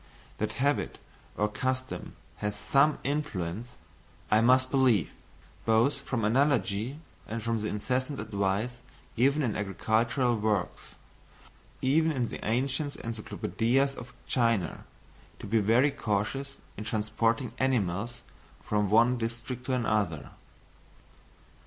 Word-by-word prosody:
That - - -1
habit 145 +2 0 0.4
or 105 - +2
custom 130 +4 -3 0.2
has 105 0 -2
some 140 +8 +3
influence, 120 - -3 0.6
I 110 +1 +5
must 130 +2 +4
believe, 125 - +3 0.5
both 115 +5 +3
from 120 -6 -1
analogy 125 -1 +1 0.3
and 115 0 -4
from 115 0 0
the 105 - -2
incessant 130 +7 -1
advice 105 +3 -1 0.4
given 140 +5 +3
in 115 -5 0
agricultural 115 +5 +1
works, 105 -3 -1 0.9
even 160 +5 +3
in 125 -6 -1
the - - -7
ancient 135 +5 0
Encyclopædias 115 +4 0
of 125 -2 -9
China, 115 -7 +1 0.5
to - - -9
be 110 +2 +2
very 115 +7 +4
cautious 135 +4 -2 0.2
in 105 - -4
transporting 115 +2 0
animals 120 -2 0 0.4
from 105 -1 0
one 120 +4 +4
district 120 +2 -4
to 130 - 0
another. 105 - 0
115 Hz, 115 wpm, -29 LUFS, 105-130 Hz, 0.9 s, I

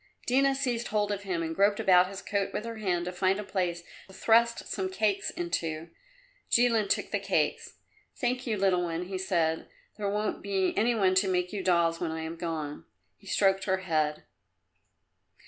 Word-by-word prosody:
Dina 270 +2 +3
seized 245 -3 -1
hold 210 -1 0
of 200 -1 -2
him 185 -4 -2
and 160 0 -3
groped 200 +2 +3
about 180 -1 +5
his 195 +1 -8
coat 200 -1 -1
with 215 - -3
her 230 -1 -5
hand 180 -5 -1
to 180 - -3
find 190 +2 +1
a - - -3
place 175 -4 -2 0.2
to 190 - -15
thrust 235 +1 +3
some 190 -2 -2
cakes 200 +1 0
into. 165 -2 -3 0.6
Jilin 230 -3 +3
took - - 0
the - - 0
cakes. - - -1 0.4
"Thank 250 0 -1
you, 220 -2 0
little 190 -2 +2
one," 170 0 -2
he 190 0 -4
said. 170 -4 0 0.3
"There 205 -2 -1
won't 210 +1 -2
be 195 -2 0
any 235 +3 +2
one 190 -4 +3
to 185 +1 +3
make 180 +1 0
you 200 - -2
dolls 170 -2 +2
when 170 - -2
I 160 0 -4
am 160 +1 -5
gone." 160 -4 -4 0.3
He 200 - -19
stroked 195 0 +2
her 190 -1 +1
head. 155 -3 0
190 Hz, 190 wpm, -29 LUFS, 175-210 Hz, 0.6 s, about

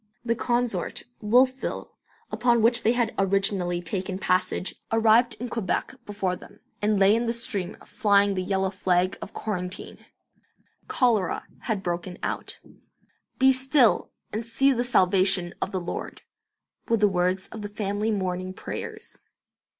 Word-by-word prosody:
The 230 - +2
consort, 240 -6 -1 0.2
'Wolfville', 255 +5 +1 0.4
upon 235 -2 +2
which 235 +1 +4
they 230 - +3
had 240 -2 0
originally 195 -2 +1
taken 185 +1 -3
passage, 185 -1 0 0.2
arrived 225 +1 +4
in 240 +4 -5
Quebec 230 +1 -2
before 195 -3 -1
them, - - -15 0.2
and 210 -1 +2
lay 195 +2 +6
in 235 +1 0
the 230 - +1
stream, 210 -6 -3
flying 200 -3 +3
the 185 - -1
yellow 190 0 0
flag 185 -1 +1
of 200 - -8
quarantine. 180 -3 -5 0.9
Cholera 220 -8 +1 0.2
had 210 -4 -1
broken 175 +1 -3
out. - - -3 0.8
"Be 265 0 +6
still, 260 -1 +3 0.2
and 220 +2 -2
see 270 +4 +2
the 245 -2 +1
salvation 185 -5 +3
of - - -2
the 185 - -1
Lord," 175 - -6 0.7
were 230 - +4
the 210 -1 +4
words 185 0 0
of 220 - -8
the 205 - -5
family 205 +1 -2
morning 185 -2 -2
prayers. - - -7
205 Hz, 140 wpm, -26 LUFS, 185-230 Hz, 0.9 s, lay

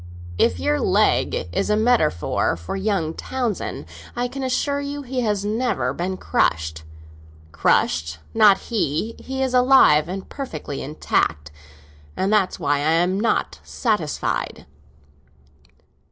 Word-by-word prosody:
"If 90 - +2
your 100 +2 +1
leg - - +1
is - - 0
a 210 - +3
metaphor 215 - +1
for 85 - -6
young 190 -5 -1
Townsend, 245 0 -3 0.3
I 245 +1 -1
can 270 +2 -7
assure 280 +2 0
you 285 0 -5
he 255 -1 -3
has 210 -3 -1
never 210 - -1
been 185 +4 -3
crushed. 80 - 0 0.7
Crushed? 80 0 +1 0.2
Not 210 -3 +6
he! 215 - -2
He 265 0 -3
is 260 -1 -1
alive 250 - +5
and 190 +1 -5
perfectly 160 - -6
intact, 75 - -1 0.7
and 195 +3 +1
that's 200 -3 +1
why 145 0 +1
I 150 +3 +1
am 180 +3 +2
not 230 +2 0
satisfied." 210 - -2
195 Hz, 125 wpm, -22 LUFS, 150-245 Hz, 0.7 s, Not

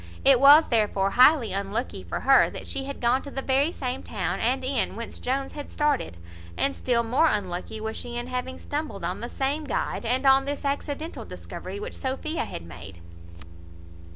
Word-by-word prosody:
It 270 -2 +7
was 290 +4 +8
therefore 205 -4 +1
highly 250 -4 +5
unlucky 200 +5 -3
for - - -4
her, - - +5
that - - -8
she 270 - -4
had 280 0 -6
gone 245 +2 +3
to 285 - -8
the 270 -1 -5
very 275 +4 +2
same 255 -5 -4
town - - -3
and 260 +3 0
inn 260 -6 0
whence 230 +1 -6
Jones 270 +2 -2
had 290 -1 -8
started, 290 - 0 0.4
and 275 - 0
still 235 -2 +1
more 255 +8 +3
unlucky 195 - -2
was 220 +1 -4
she 240 0 -5
in 240 - -3
having 255 +1 -4
stumbled 300 +1 -5
on - - -2
the - - -5
same 280 +3 -1
guide, 285 - -2
and 250 +4 0
on 270 0 +5
this 285 0 -4
accidental 285 +3 -3
discovery 405 - -8
which 455 +4 -6
Sophia 285 +4 -2
had 85 - -7
made. 85 +1 -10
260 Hz, 185 wpm, -26 LUFS, 230-280 Hz, 0.4 s, was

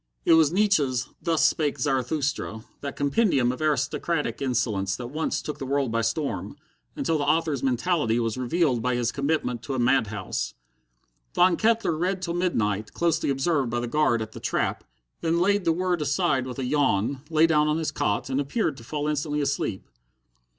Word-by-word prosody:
It - - +6
was 160 -2 +5
Nietzsche's 155 - +2
"Thus 160 -2 +2
Spake 150 -3 +1
Zarathusta," 135 -3 -1 0.2
that 140 -1 -5
compendium 140 - +2
of 130 - -7
aristocratic 150 +2 -1
insolence 110 -7 0
that 120 -1 -6
once 155 +2 -2
took 150 -1 -5
the 135 - -4
world 140 -3 0
by 115 0 +1
storm, 125 +6 -2 0.4
until 165 -2 0
the - - 0
author's 155 -2 +1
mentality 130 -2 +1
was 115 -2 -1
revealed 130 0 +1
by 125 +1 0
his 120 -1 0
commitment 140 -4 -1
to 135 - -4
a - - -1
mad 125 -1 +3
house. 100 -3 -4 0.8
Von 180 0 +5
Kettler 225 -5 +2
read 185 +4 -1
till 175 -2 -3
midnight, 110 - -1
closely 170 -3 +1
observed 135 -1 +1
by 120 +1 -1
the 120 - -3
guard 120 -4 +2
at 110 - -9
the - - -9
trap, - - -1 0.4
then 165 +1 +1
laid 200 +2 +2
the 165 - +4
word 180 0 0
aside 135 -2 +1
with 125 - -6
a 135 - -2
yawn, 130 -2 +1
lay 160 0 +4
down 150 -2 +3
on 150 +1 +1
his 160 -2 -1
cot, 105 -8 -1
and 135 +1 0
appeared 145 - -1
to 115 - -11
fall 150 +4 -3
instantly 150 0 -1
asleep. 140 -8 -2
140 Hz, 185 wpm, -25 LUFS, 125-160 Hz, 0.8 s, It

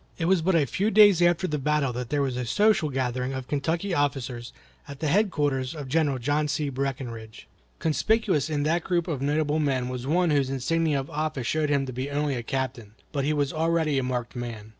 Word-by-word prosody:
It 165 - -2
was 185 0 +3
but 180 +2 +2
a 155 -4 +4
few 195 - 0
days 205 -4 +6
after 175 +1 +3
the 150 -4 -2
battle 145 -2 0
that 125 -1 -5
there 145 -1 +1
was 130 -2 -2
a 125 - -2
social 195 - +2
gathering 130 -1 -2
of 130 -1 -5
Kentucky 165 +7 -1
officers 130 -5 -2 0.4
at 140 -1 -9
the 160 - -3
headquarters 145 -8 +1
of 145 -3 -6
General 145 -1 +1
John 145 +4 0
C. 145 0 -1
Breckinridge. 125 -5 -5 0.3
Conspicuous 165 - +1
in 145 -2 -1
that 165 +3 +1
group 175 -2 0
of 150 -6 -3
notable 150 +2 +1
men 130 -4 0
was 125 0 -5
one 175 +2 +2
whose 140 -3 +2
insignia 150 +3 0
of 135 - -7
office 150 -4 -2
showed 155 +3 0
him 140 -2 +1
to 130 - -6
be 130 +3 -4
only 145 0 -1
a 120 - -2
captain. 120 -4 -4 0.2
But 140 -3 -1
he 150 - +1
was 145 -2 0
already 160 -3 +1
a - - -2
marked 125 -1 -3
man. 115 -3 -6
145 Hz, 215 wpm, -26 LUFS, 130-160 Hz, 0.4 s, days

